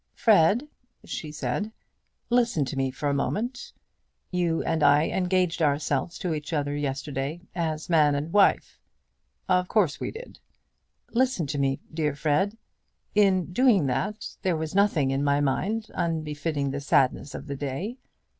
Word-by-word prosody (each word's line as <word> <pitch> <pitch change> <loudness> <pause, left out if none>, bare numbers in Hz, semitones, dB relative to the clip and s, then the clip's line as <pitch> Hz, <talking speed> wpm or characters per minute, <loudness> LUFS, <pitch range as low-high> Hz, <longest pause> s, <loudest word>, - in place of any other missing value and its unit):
"Fred," 215 - +4 0.4
she 155 - -5
said, 150 - -3 0.6
"listen 235 - +2
to 130 - -5
me 135 -1 0
for 140 +3 -4
a 140 - +1
moment. 225 - -2 0.6
You 175 -3 0
and 160 -1 0
I 145 +2 +5
engaged 180 -2 0
ourselves 145 +1 0
to 175 -3 -2
each 150 +1 -5
other 145 -1 -1
yesterday 140 +2 -3
as 160 -3 -2
man 150 -4 +4
and 150 +4 -3
wife." 205 -1 +3 0.7
"Of 180 0 +2
course 180 -9 +1
we - - -3
did." 470 +3 -10 0.7
"Listen 250 -8 +1
to 145 0 -3
me, 135 -1 0
dear 150 -3 -1
Fred. 155 +9 0 0.6
In 190 -4 +3
doing 230 - +4
that 135 - -3
there 180 -4 +1
was 155 0 -4
nothing 185 -9 +3
in 135 +1 0
my 140 0 +2
mind 205 +11 -1
unbefitting 155 -4 -2
the 140 +1 -4
sadness 140 0 +1
of - - -7
the 140 -1 -5
day. 145 - -4
160 Hz, 150 wpm, -26 LUFS, 145-190 Hz, 0.7 s, I